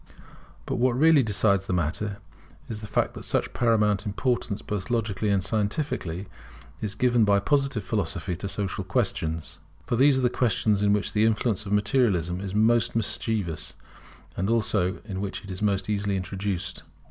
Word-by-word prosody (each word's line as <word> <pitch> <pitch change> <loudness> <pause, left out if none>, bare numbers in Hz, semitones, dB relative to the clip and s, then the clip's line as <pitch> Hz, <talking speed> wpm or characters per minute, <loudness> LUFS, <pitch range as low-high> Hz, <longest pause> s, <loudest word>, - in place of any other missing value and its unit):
But - - -2
what 125 0 +2
really 160 0 +6
decides 100 -3 +2
the - - -1
matter 90 +5 -1 0.5
is 110 -2 -6
the 105 - -7
fact - - 0
that - - -8
such - - -1
paramount 105 -4 +2
importance, 110 0 -1
both 105 0 -4
logically 110 -3 0
and 100 -2 +2
scientifically, 105 - -2 0.6
is 105 -1 -3
given 120 0 +3
by 100 -1 +4
Positive 135 -1 +1
Philosophy 95 -3 -2
to 100 - -5
social 95 -1 -2
questions. 80 -2 -2 0.3
For 120 - 0
these 135 +2 +5
are - - +1
the - - +4
questions 110 -3 +1
in 100 0 +3
which 105 0 0
the 105 - +3
influence 110 -2 +1
of - - -5
Materialism 105 -5 +1
is 100 0 -5
most 115 +2 +3
mischievous, 105 -5 -2 0.6
and 95 +3 -1
also 110 -5 +1
in 95 -3 -4
which 100 -1 -4
it 100 - -8
is 95 - -6
most 100 -2 +1
easily 100 -1 0
introduced. 95 0 -3
105 Hz, 170 wpm, -26 LUFS, 95-115 Hz, 0.6 s, really